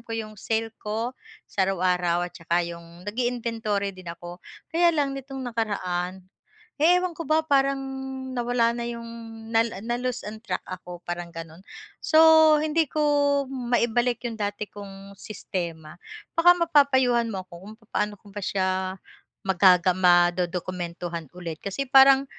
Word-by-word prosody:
ko 230 Hz, -1 st, -6 dB
'yong 215 Hz, -2 st, -7 dB
sale 225 Hz, 0 st, -1 dB
ko 225 Hz, +4 st, -3 dB, 0.3 s
sa 190 Hz, -1 st, 0 dB
araw-araw 180 Hz, -2 st, +1 dB
at -, -, -28 dB
saka 170 Hz, +1 st, 0 dB
'yong 170 Hz, +1 st, -10 dB
nag 205 Hz, +3 st, -6 dB
i-inventory 225 Hz, -5 st, -1 dB
din 185 Hz, -2 st, -11 dB
ako, 175 Hz, +1 st, -8 dB, 0.3 s
kaya 340 Hz, +1 st, +4 dB
lang 285 Hz, -3 st, 0 dB
nitong 270 Hz, -1 st, -7 dB
nakaraan, 190 Hz, -6 st, -2 dB, 0.6 s
ewan 360 Hz, +2 st, +4 dB
ko 325 Hz, -3 st, -7 dB
ba 315 Hz, +1 st, +3 dB
parang 275 Hz, -2 st, +3 dB, 0.6 s
nawala 240 Hz, -1 st, +2 dB
na 235 Hz, 0 st, -4 dB
'yong 235 Hz, -1 st, -6 dB, 0.8 s
na-lose 245 Hz, +1 st, -2 dB
on 215 Hz, +1 st, -8 dB
track 185 Hz, -5 st, -4 dB
ako 180 Hz, -1 st, -9 dB
parang 175 Hz, 0 st, -4 dB
gano'n, 165 Hz, +1 st, -9 dB, 0.4 s
so, 315 Hz, -1 st, +7 dB
hindi 310 Hz, 0 st, +1 dB
ko 305 Hz, +2 st, 0 dB, 0.4 s
maibalik 240 Hz, -1 st, 0 dB
yung 230 Hz, -, -6 dB
dati 205 Hz, +1 st, -2 dB
kong 195 Hz, -1 st, -11 dB
sistema 170 Hz, -6 st, -5 dB, 0.4 s
baka 340 Hz, +1 st, +7 dB
mapapayuhan 265 Hz, -8 st, +3 dB
mo 190 Hz, -4 st, -5 dB
ako 185 Hz, -, -45 dB
kung 210 Hz, +2 st, -10 dB, 0.2 s
paano 210 Hz, 0 st, 0 dB
ko 200 Hz, -2 st, -16 dB
pa 205 Hz, -, -5 dB
siya 190 Hz, -1 st, 0 dB, 0.8 s
magaga 185 Hz, -1 st, +5 dB
ma-dodokumentuhan 175 Hz, -2 st, +1 dB
ulit 165 Hz, -3 st, -6 dB
kasi 200 Hz, +8 st, -3 dB
parang 270 Hz, 0 st, +7 dB
215 Hz, 140 wpm, -25 LUFS, 180-250 Hz, 0.8 s, so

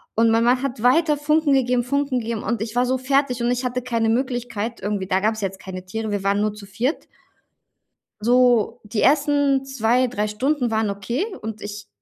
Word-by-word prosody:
Und 225 Hz, +1 st, +4 dB
mein 225 Hz, +1 st, +3 dB
Mann 250 Hz, +2 st, +3 dB
hat 255 Hz, -5 st, -4 dB
weiter 300 Hz, +4 st, +4 dB
Funken 300 Hz, 0 st, +2 dB
gegeben, 250 Hz, -2 st, +2 dB
Funken 280 Hz, 0 st, 0 dB
gegeben. 230 Hz, -2 st, -4 dB
Und 230 Hz, -2 st, -2 dB
ich 220 Hz, +1 st, -4 dB
war 245 Hz, +1 st, +3 dB
so 260 Hz, +1 st, 0 dB
fertig 265 Hz, -2 st, +1 dB
und 235 Hz, -, +1 dB
ich 250 Hz, +1 st, -1 dB
hatte 250 Hz, 0 st, -2 dB
keine 230 Hz, -2 st, 0 dB
Möglichkeit, 240 Hz, -2 st, -2 dB
irgendwie 200 Hz, -2 st, -2 dB
Da 190 Hz, 0 st, +2 dB
gab 215 Hz, +3 st, +1 dB
es 220 Hz, -, -7 dB
jetzt 195 Hz, -1 st, -3 dB
keine 185 Hz, -1 st, -8 dB
Tiere, 220 Hz, +3 st, -4 dB
wir 200 Hz, -1 st, -2 dB
waren 200 Hz, +1 st, +1 dB
nur 210 Hz, 0 st, 0 dB
zu 210 Hz, -1 st, -11 dB
viert. 250 Hz, +9 st, -2 dB, 1.1 s
So 245 Hz, 0 st, +3 dB
die 210 Hz, +1 st, -2 dB
ersten 285 Hz, -1 st, +3 dB
2, 255 Hz, -1 st, +1 dB
3 215 Hz, -3 st, -2 dB
Stunden 250 Hz, +4 st, 0 dB
waren 220 Hz, -1 st, 0 dB
okay 235 Hz, -, -2 dB, 0.2 s
und 220 Hz, 0 st, -6 dB
ich 210 Hz, +1 st, -8 dB
240 Hz, 205 wpm, -22 LUFS, 215-260 Hz, 1.1 s, Und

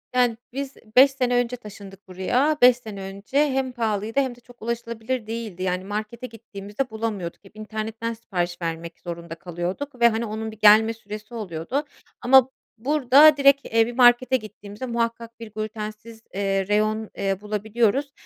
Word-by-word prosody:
Yani, 245 Hz, -2 st, +3 dB, 0.2 s
biz 275 Hz, 0 st, -5 dB, 0.2 s
5 265 Hz, +2 st, +8 dB
sene 250 Hz, -2 st, 0 dB
önce 245 Hz, 0 st, +1 dB
taşındık 200 Hz, -3 st, -12 dB
buraya. 245 Hz, +12 st, +1 dB
5 250 Hz, 0 st, +7 dB
sene 215 Hz, -5 st, -9 dB
önce 195 Hz, +7 st, -5 dB
hem 265 Hz, -1 st, -1 dB
pahalıydı 225 Hz, 0 st, -1 dB
hem 260 Hz, -3 st, 0 dB
de -, -, -19 dB
çok 245 Hz, 0 st, -19 dB
ulaşılabilir 235 Hz, +1 st, -3 dB
değildi. 220 Hz, -5 st, -5 dB
Yani, 180 Hz, 0 st, -1 dB
markete 215 Hz, +5 st, -5 dB
gittiğimizde 220 Hz, +1 st, -6 dB
bulamıyorduk. 215 Hz, -6 st, -4 dB
Hep 195 Hz, -, -18 dB
internetten 220 Hz, +1 st, -4 dB
sipariş 180 Hz, -6 st, -4 dB
vermek 165 Hz, 0 st, -5 dB
zorunda 170 Hz, -1 st, -7 dB
kalıyorduk 180 Hz, -, -5 dB
ve, 235 Hz, -, +8 dB
hani, 225 Hz, +1 st, -2 dB
onun 220 Hz, 0 st, -4 dB
bir 215 Hz, -, -14 dB
gelme 220 Hz, +1 st, +6 dB
süresi 215 Hz, +1 st, -10 dB
oluyordu 215 Hz, -, -3 dB, 0.4 s
ama 265 Hz, 0 st, +6 dB, 0.3 s
burada 290 Hz, +4 st, +5 dB
direkt, 275 Hz, 0 st, +5 dB
eee, 225 Hz, 0 st, +3 dB
bir 240 Hz, -, -5 dB
markete 250 Hz, +1 st, +5 dB
gittiğimizde 210 Hz, +1 st, -9 dB
muhakkak 230 Hz, -1 st, -3 dB
bir 225 Hz, -2 st, -9 dB
glütensiz, 215 Hz, +1 st, -6 dB
eee, 195 Hz, -1 st, 0 dB
reyon, 215 Hz, +1 st, 0 dB
eee, 195 Hz, -1 st, 0 dB
bulabiliyoruz. 220 Hz, +6 st, 0 dB
220 Hz, 160 wpm, -24 LUFS, 205-245 Hz, 0.4 s, 5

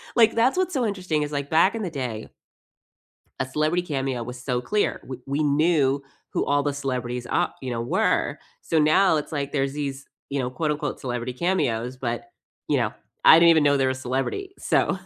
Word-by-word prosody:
Like 230 Hz, -2 st, +5 dB
that's 250 Hz, +9 st, +3 dB
what's 370 Hz, -1 st, 0 dB
so 255 Hz, -5 st, +1 dB
interesting 185 Hz, -7 st, -1 dB
is 145 Hz, -, -5 dB
like 140 Hz, -1 st, -3 dB
back 170 Hz, +7 st, +4 dB
in 225 Hz, -, -3 dB
the 180 Hz, -, -2 dB
day 125 Hz, -7 st, -4 dB, 1.1 s
a -, -, 0 dB
celebrity 155 Hz, +6 st, 0 dB
cameo 135 Hz, -6 st, -2 dB
was 125 Hz, +1 st, -8 dB
so 125 Hz, -1 st, -1 dB
clear, 210 Hz, +11 st, 0 dB
we 130 Hz, -, -6 dB
we 140 Hz, +3 st, 0 dB
knew 145 Hz, -2 st, +2 dB, 0.3 s
who -, -, 0 dB
all 145 Hz, 0 st, +2 dB
the 145 Hz, 0 st, -1 dB
celebrities 125 Hz, -3 st, -3 dB
ar -, -, 0 dB
you 130 Hz, -, -4 dB
know, 115 Hz, -, -2 dB
were. 115 Hz, -, 0 dB, 0.2 s
So 160 Hz, -, +1 dB
now 155 Hz, +3 st, +4 dB
it's 150 Hz, -, -5 dB
like 140 Hz, -2 st, -3 dB
there's 135 Hz, -1 st, 0 dB
these, 140 Hz, -2 st, -4 dB, 0.2 s
you 140 Hz, 0 st, -2 dB
know, 125 Hz, -1 st, -1 dB
quote 150 Hz, +4 st, -1 dB
unquote 150 Hz, -1 st, -3 dB
celebrity 125 Hz, -1 st, -3 dB
cameos, 130 Hz, -7 st, -1 dB
but, 120 Hz, -2 st, -3 dB, 0.4 s
you -, -, +2 dB
know, -, -, 0 dB, 0.3 s
I 160 Hz, -, +10 dB
didn't 170 Hz, 0 st, +7 dB
even 160 Hz, -2 st, +5 dB
know 145 Hz, -1 st, +4 dB
they're 135 Hz, -1 st, +2 dB
a -, -, -3 dB
celebrity. 135 Hz, -, -3 dB
So -, -, +1 dB
145 Hz, 205 wpm, -24 LUFS, 130-165 Hz, 1.1 s, I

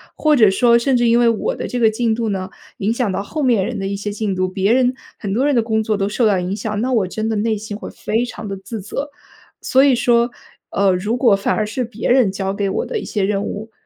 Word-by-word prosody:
或 305 Hz, -1 st, +3 dB
者 220 Hz, -6 st, +6 dB
说 235 Hz, +4 st, +4 dB
甚 255 Hz, +3 st, +1 dB
至 240 Hz, 0 st, +2 dB
因 230 Hz, +1 st, +4 dB
为 240 Hz, -, +4 dB
我 230 Hz, -, -1 dB
的 -, -, -5 dB
这 245 Hz, -, -3 dB
个 225 Hz, -2 st, +5 dB
进 225 Hz, +1 st, 0 dB
度 225 Hz, -1 st, -2 dB
呢， 190 Hz, -2 st, -3 dB, 0.3 s
影 210 Hz, +3 st, 0 dB
响 235 Hz, -2 st, -1 dB
到 190 Hz, -, -2 dB
后 305 Hz, +9 st, -5 dB
面 235 Hz, -7 st, +3 dB
人 230 Hz, +1 st, -4 dB
的 195 Hz, -, -2 dB
一 200 Hz, -, -2 dB
些 205 Hz, +1 st, -4 dB
进 205 Hz, -2 st, -2 dB
度， 185 Hz, 0 st, 0 dB
别 190 Hz, +4 st, +1 dB
人 255 Hz, 0 st, +3 dB, 0.2 s
很 200 Hz, -3 st, -4 dB
多 250 Hz, +6 st, +1 dB
人 290 Hz, -, +2 dB
的 235 Hz, -, +4 dB
工 220 Hz, -1 st, 0 dB
作 215 Hz, 0 st, 0 dB
都 195 Hz, 0 st, 0 dB
受 230 Hz, +3 st, +1 dB
到 205 Hz, -3 st, +3 dB
影 180 Hz, +1 st, -3 dB
响， 210 Hz, -1 st, -3 dB
那 255 Hz, +2 st, -1 dB
我 220 Hz, -7 st, +2 dB
真 215 Hz, +4 st, -3 dB
的 220 Hz, -, -1 dB
内 220 Hz, +1 st, 0 dB
心 210 Hz, 0 st, -7 dB
会 -, -, -8 dB
非 225 Hz, +3 st, -2 dB
常 225 Hz, -3 st, -8 dB
地 195 Hz, -, -4 dB
自 195 Hz, +3 st, -7 dB
责。 275 Hz, +9 st, -5 dB, 0.5 s
所 265 Hz, +1 st, +3 dB
以 270 Hz, -, +4 dB
说， 240 Hz, 0 st, +2 dB, 0.4 s
呃， 200 Hz, -1 st, +2 dB
如 205 Hz, +6 st, -1 dB
果 240 Hz, -4 st, +4 dB
反 195 Hz, -, 0 dB
而 215 Hz, -, 0 dB
是 240 Hz, +4 st, -3 dB
别 230 Hz, +1 st, -3 dB
人 250 Hz, -5 st, +4 dB
交 195 Hz, 0 st, -3 dB
给 200 Hz, 0 st, -1 dB
我 -, -, -2 dB
的 450 Hz, -, -3 dB
一 -, -, -7 dB
些 205 Hz, -3 st, -2 dB
任 200 Hz, 0 st, 0 dB
务， 215 Hz, +2 st, -5 dB
220 Hz, 300 characters per minute, -19 LUFS, 200-240 Hz, 0.5 s, 者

